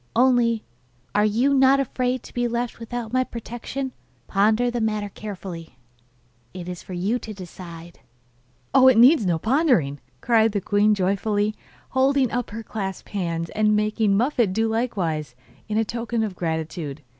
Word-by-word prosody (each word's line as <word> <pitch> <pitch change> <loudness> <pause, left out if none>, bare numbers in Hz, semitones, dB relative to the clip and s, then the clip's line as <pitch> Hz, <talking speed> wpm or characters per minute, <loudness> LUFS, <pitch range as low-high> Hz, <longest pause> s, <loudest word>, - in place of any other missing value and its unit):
Only, 235 -2 +3 0.5
are 210 - +3
you 240 +7 +2
not 270 0 +5
afraid 255 -1 -1
to - - -13
be 245 0 0
left 240 0 -3
without 235 0 -5
my 255 0 +3
protection? 240 +3 -6 0.3
Ponder 215 +5 +2
the 240 -1 -2
matter 215 -2 -1
carefully; 185 -8 -8 0.8
it 180 -1 -7
is 180 -1 -6
for 185 - -9
you 195 +7 0
to 215 -3 -8
decide.' 175 -2 -10 0.7
'Oh, 260 -1 +7
it 260 -3 +6
needs 245 - +6
no 170 -2 +2
pondering,' 220 - +2 0.2
cried 225 - +3
the 205 - +1
queen 205 +2 +2
joyfully, 205 +2 0 0.4
holding 265 -1 +2
up 245 -1 -2
her 225 +2 -6
clasped 195 -3 -5
hands, 170 -4 -3
and 215 0 +2
making 210 -1 +2
Muffette 235 -4 +1
do 225 +3 +1
likewise, 180 - -2 0.3
in 220 +1 +1
token 230 0 -2
of 205 -4 -3
gratitude. 160 -3 -4
215 Hz, 155 wpm, -23 LUFS, 190-240 Hz, 0.8 s, Oh